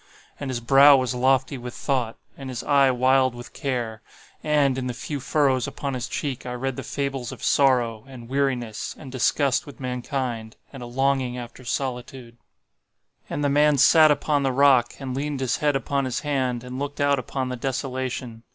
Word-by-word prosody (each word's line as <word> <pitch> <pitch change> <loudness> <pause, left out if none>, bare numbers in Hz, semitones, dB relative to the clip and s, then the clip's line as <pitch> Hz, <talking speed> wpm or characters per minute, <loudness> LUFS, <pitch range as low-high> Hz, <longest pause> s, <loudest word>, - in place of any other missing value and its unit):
And 140 - -4
his 125 -2 -3
brow 135 +3 +7
was 130 -1 -1
lofty 130 +1 +1
with 120 0 -8
thought, 125 -5 -1 0.2
and 135 -1 -8
his 125 -1 -5
eye 140 -2 +4
wild 130 0 +3
with 120 0 -10
care; 120 -6 -3 0.4
and, 145 -3 +2
in 130 -1 -3
the 125 - -4
few 145 +5 -5
furrows 135 -2 +1
upon 140 -1 -4
his 125 0 -3
cheek 135 -3 -4
I 125 - -5
read 130 +1 -3
the - - -5
fables 135 -3 -3
of - - -10
sorrow, 120 -5 +2
and 125 -3 -11
weariness, 125 -5 -2
and 135 -4 -10
disgust 135 +1 +1
with 145 - -11
mankind, 125 -3 -4 0.2
and 135 - -9
a 120 - -6
longing 130 0 0
after 120 +1 -9
solitude. 125 -1 -4 0.9
"And 145 - -3
the 145 - +2
man 145 +1 +4
sat 155 +3 +7
upon 150 0 +1
the 135 -1 +1
rock, 130 -2 +4
and 130 -2 -5
leaned 145 0 -3
his 130 -2 0
head 145 -2 +1
upon 140 0 -1
his 130 - -2
hand, 130 -5 -1
and 125 +1 -6
looked 145 0 -5
out 145 -1 +3
upon 130 +1 -3
the 125 - -3
desolation. 130 -2 -4
130 Hz, 190 wpm, -24 LUFS, 125-140 Hz, 0.9 s, brow